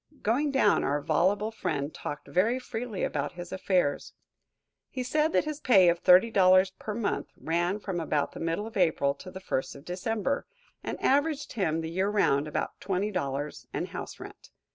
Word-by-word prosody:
Going 260 +8 +2
down, 265 -7 +3
our 145 +2 +1
voluble 190 +8 +1
friend 145 -8 -3
talked 145 - -6
very 220 +8 +2
freely 240 -4 -5
about - - -2
his 175 0 -8
affairs. 185 -6 0 0.8
He 255 - -4
said 300 +5 +1
that - - +3
his 305 -1 -4
pay 195 - +6
of 170 0 0
$30 185 -1 +6
per 215 - -4
month 215 -3 -1
ran 175 +4 0
from 190 -4 -3
about 150 -3 0
the - - -9
middle 165 +5 -2
of 225 - -9
April 160 -7 +2
to 185 +6 -11
the 185 - -8
first 130 -8 -3
of 140 +2 -13
December, 225 +9 -2 0.4
and - - -4
averaged 290 +1 +1
him, 165 -7 0
the 160 0 -5
year 190 +3 0
round, 155 -8 +2
about 150 - -3
$20 180 -8 -2
and - - -3
house - - -7
rent. - - -11
185 Hz, 175 wpm, -28 LUFS, 165-225 Hz, 0.8 s, pay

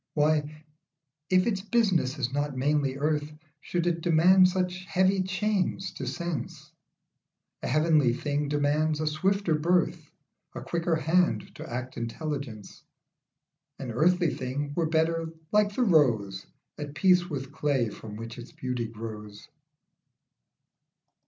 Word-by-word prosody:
Why, 150 0 +1 0.6
if 185 0 +4
its 200 -5 0
business 190 - +1
is 125 -2 -2
not 145 -1 -2
mainly 140 0 +1
earth, 150 +1 -1 0.3
Should 175 +2 -2
it 170 -1 0
demand 175 +3 +6
such 180 0 -2
heavy 190 +2 +2
chains 190 0 -1
to - - -6
sense? 170 -7 -5 0.9
A - - -3
heavenly 155 -2 +3
thing 145 +3 -2
demands 150 +2 +1
a 155 - -1
swifter 180 +4 +1
birth, 170 +3 +1 0.5
A - - -5
quicker 170 0 0
hand 165 +3 +1
to - - -9
act 125 +1 -5
intelligence; 120 -2 -5 1.0
An 130 -3 -5
earthly 170 +6 +2
thing 140 +3 -4
were 165 +1 0
better 160 0 +1 0.2
like 210 -1 +3
the 255 - +2
rose, 115 - +2 0.3
At 145 -1 -6
peace 180 +2 +4
with 135 -2 -5
clay 140 -6 0
from 105 0 -9
which 115 +2 -8
its 120 - -10
beauty 125 -2 -3
grows. 105 -2 -9
155 Hz, 130 wpm, -28 LUFS, 135-180 Hz, 1.0 s, demand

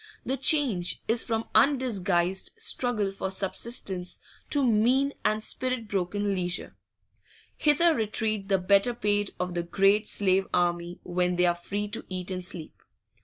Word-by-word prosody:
The 265 - -1
change 260 - +2
is 225 +1 +1
from 225 -1 -2
undisguised 200 -8 +2
struggle 245 - 0
for 195 -1 -4
subsistence 190 -1 -3 0.3
to 285 -2 +2
mean 250 +5 +3
and 215 0 +1
spirit 255 -2 -2
broken 200 +1 -1
leisure; 180 -1 -2 0.8
hither 315 +3 +3
retreat 215 -3 -1
the 195 - +4
better 200 +6 +3
paid 205 -2 +1
of 180 0 -2
the 175 - -1
great 195 +4 +2
slave 190 -1 +2
army 175 0 0
when 180 0 0
they 180 0 +3
are 175 - +4
free 200 +4 -4
to - - -4
eat 185 0 -4
and 185 -1 -4
sleep. 175 -3 -5
200 Hz, 145 wpm, -27 LUFS, 180-235 Hz, 0.8 s, the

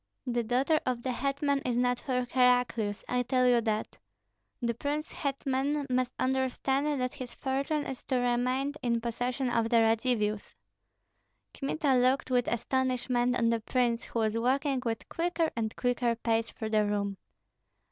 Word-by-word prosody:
The 240 -2 0
daughter 265 +7 +2
of 245 -2 -2
the 260 - -1
hetman 280 +2 0
is 245 -2 -1
not 245 0 +2
for 250 -3 -1
Heraclius, 245 -5 +2
I 250 0 +1
tell 255 +1 +2
you 240 -1 +4
that! 215 -1 -2 0.6
The 235 -2 0
prince 290 +6 -3
hetman 275 +1 -1
must 255 0 +1
understand 265 +2 0
that 255 0 -1
his 255 -4 -8
fortune 280 +3 -1
is 265 - -5
to 260 - -1
remain 250 +3 +1
in 235 -1 +1
possession 245 +2 -2
of 230 -1 +1
the 235 - +4
Radzivills." 225 -2 +1 1.0
Kmita 280 0 0
looked 255 +1 +2
with 245 -1 +2
astonishment 250 0 0
on 230 -1 +2
the 230 - +1
prince, 235 +1 0
who - - -6
was 220 -1 +1
walking 265 +3 +1
with 225 -2 -3
quicker 335 -1 0
and 225 -2 -2
quicker 245 -1 +1
pace 230 0 0
through 220 -1 -6
the 215 -1 +4
room. 200 -1 -1
250 Hz, 155 wpm, -30 LUFS, 235-265 Hz, 1.0 s, you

